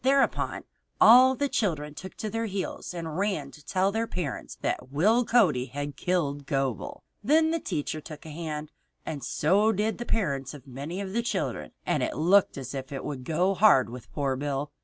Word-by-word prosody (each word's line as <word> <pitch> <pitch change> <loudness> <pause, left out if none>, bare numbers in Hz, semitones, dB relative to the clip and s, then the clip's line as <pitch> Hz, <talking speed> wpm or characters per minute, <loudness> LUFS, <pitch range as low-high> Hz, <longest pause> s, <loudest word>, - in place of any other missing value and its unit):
Thereupon 275 +1 +2 0.4
all 255 +3 +8
the 285 +2 0
children 155 - -1
took 190 +5 -9
to 215 - -4
their 225 0 -1
heels 195 -2 -4
and 165 -1 -5
ran 190 -9 -1
to 150 - -15
tell 185 +6 +1
their 225 +2 -1
parents 170 - -4
that - - -2
Will 210 - +3
Cody 185 - +3
had 145 +2 -5
killed 145 -6 -1
Gobel. 135 -7 -2 0.2
Then 315 +7 +4
the 330 - 0
teacher 155 - -3
took 155 0 -10
a 160 - -8
hand, 155 -1 -5 0.3
and 145 -4 -5
so 195 - +3
did 220 +2 -1
the 240 - -4
parents 140 - -1
of 140 - -13
many 145 +8 -5
of 190 -1 -5
the 235 - +1
children, 235 - -3
and - - +1
it - - -2
looked 180 +4 +4
as 130 -1 -6
if 135 0 -6
it 135 - -5
would 135 -3 -5
go 175 +7 +1
hard 135 - +5
with 125 0 -10
poor 140 -3 -1
Bill. 145 +1 -3
160 Hz, 195 wpm, -27 LUFS, 140-210 Hz, 0.4 s, all